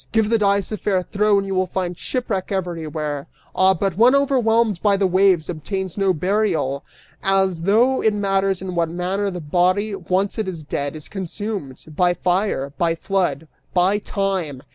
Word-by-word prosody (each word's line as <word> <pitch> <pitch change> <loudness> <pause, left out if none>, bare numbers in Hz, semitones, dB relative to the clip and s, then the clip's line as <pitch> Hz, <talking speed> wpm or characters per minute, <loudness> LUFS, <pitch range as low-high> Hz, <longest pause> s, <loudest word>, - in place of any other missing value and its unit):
Give 220 -1 +2
the 230 - +3
dice 200 -1 +1
a 215 - -2
fair 190 -2 0
throw 210 +2 +2
and 195 - 0
you 195 - -3
will 185 0 +1
find 180 -1 -3
shipwreck 215 -4 -3
everywhere! 155 -6 -3 0.3
Ah, 190 0 +4
but 190 0 -1
one 245 +5 +6
overwhelmed 235 -7 +2
by 205 -2 +3
the 195 - +2
waves 185 -3 +3
obtains 185 +3 -4
no 195 -2 +2
burial! 175 -6 0 0.4
As 190 -3 +1
though 230 +8 +3
it 220 - +3
matters 195 -2 0
in 185 -1 -4
what 170 -1 0
manner 185 +4 -1
the 180 -2 -5
body, 180 +6 +1
once 195 +3 -1
it 215 - -1
is 170 -4 -5
dead, 145 0 -3
is 155 - -8
consumed: 195 - -5
by 175 +1 +3
fire, 180 -8 0
by 165 -1 +2
flood, 165 -5 -1 0.3
by 185 +3 +3
time! 190 -10 -2
190 Hz, 175 wpm, -21 LUFS, 175-205 Hz, 0.4 s, one